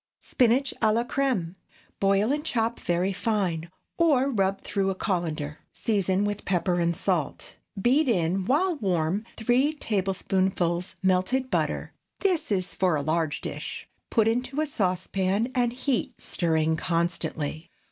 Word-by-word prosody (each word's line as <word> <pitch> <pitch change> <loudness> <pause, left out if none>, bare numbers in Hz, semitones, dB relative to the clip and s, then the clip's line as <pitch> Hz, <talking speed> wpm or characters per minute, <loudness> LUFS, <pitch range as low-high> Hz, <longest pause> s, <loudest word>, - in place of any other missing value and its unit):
SPINACH 255 +2 +2
À 215 - +4
LA 230 +2 +2
CRÈME. 245 -10 -1 0.5
Boil 200 +4 +3
and 295 +1 0
chop 235 -6 0
very 180 +3 0
fine, 185 -6 -1 0.3
or 280 -5 +4
rub 195 -4 +1
through 195 -1 -1
a 190 - -1
cullender. 160 -6 -2 0.2
Season 200 -2 +1
with 205 0 -3
pepper 180 -1 +1
and 170 0 +1
salt. 170 -5 -2 0.2
Beat 260 +7 +3
in, 185 -2 +1
while 325 - +2
warm, 185 - 0
three 250 +6 +2
tablespoonfuls 190 - -1
melted 190 +8 +1
butter - - -1 0.3
(this 350 - +1
is 185 -3 0
for 185 -3 +2
a 145 - -1
large 160 0 0
dish). - - -5 0.2
Put 225 -2 +3
into 250 +5 0
a 310 - +2
saucepan 195 -1 0
and 245 -2 +2
heat, 255 0 -2
stirring 160 -2 0
constantly. 165 -2 -2
195 Hz, 135 wpm, -26 LUFS, 175-245 Hz, 0.5 s, À